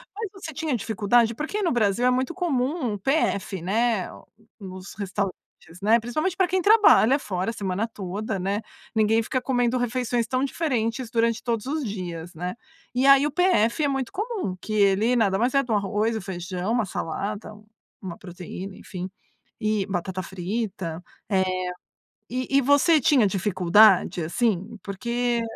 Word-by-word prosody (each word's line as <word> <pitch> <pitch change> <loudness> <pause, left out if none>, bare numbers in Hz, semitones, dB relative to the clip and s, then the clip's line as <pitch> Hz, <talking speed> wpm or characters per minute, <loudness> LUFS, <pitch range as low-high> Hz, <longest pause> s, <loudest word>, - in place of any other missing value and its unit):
Mas 435 -1 -4
você 340 -5 -8
tinha 310 -3 -1
dificuldade? 225 +1 +2
Porque 365 - -3
no 345 - +1
Brasil 225 0 +1
é - - +5
muito 260 +6 0
comum 280 - -1
um - - -3
PF, 200 - 0
né, 215 +1 0 0.5
nos 185 -1 -9
restaurantes, 195 -1 -2 0.5
né. 225 +3 +4
Principalmente 310 +11 -2
pra 375 -2 +2
quem 375 +1 +1
trabalha 395 - +6
fora 190 0 -2
a - - -9
semana 200 +2 -2
toda, 200 0 -4
né. 200 +4 -1 0.3
Ninguém 220 +1 +3
fica 255 +3 -1
comendo 245 -1 +1
refeições 245 -1 0
tão 255 +2 0
diferentes 250 -5 -1
durante 230 -1 +1
todos 230 -2 -1
os 295 -4 -2
dias, 175 -4 -6
né. 180 +2 -4 0.4
E 255 - +2
aí 275 +1 +7
o - - -4
PF 305 - +2
é 290 - +3
muito 270 -3 -2
comum. 415 - -3
Que 215 - -6
ele 205 +4 +3
nada 200 -5 +2
mais 245 +4 +1
é 275 - +4
de 240 - -6
um - - +3
arroz, 210 +3 0
o 220 - -3
feijão, 180 +2 -4
uma 235 -3 +1
salada, 200 +5 -4 0.5
uma 185 -3 -7
proteína, 185 +1 -8
enfim, 185 -1 -7 0.5
e 215 -3 0
batata 185 0 -3
frita. 190 -3 -4 0.3
Eh, 185 -2 +1 0.7
e 255 +2 -1
e - - +5
você 285 +4 +4
tinha 250 -4 +4
dificuldade, 195 -1 +4
assim? 215 +3 -1
Porque 235 +4 -1
220 Hz, 160 wpm, -25 LUFS, 195-255 Hz, 0.7 s, aí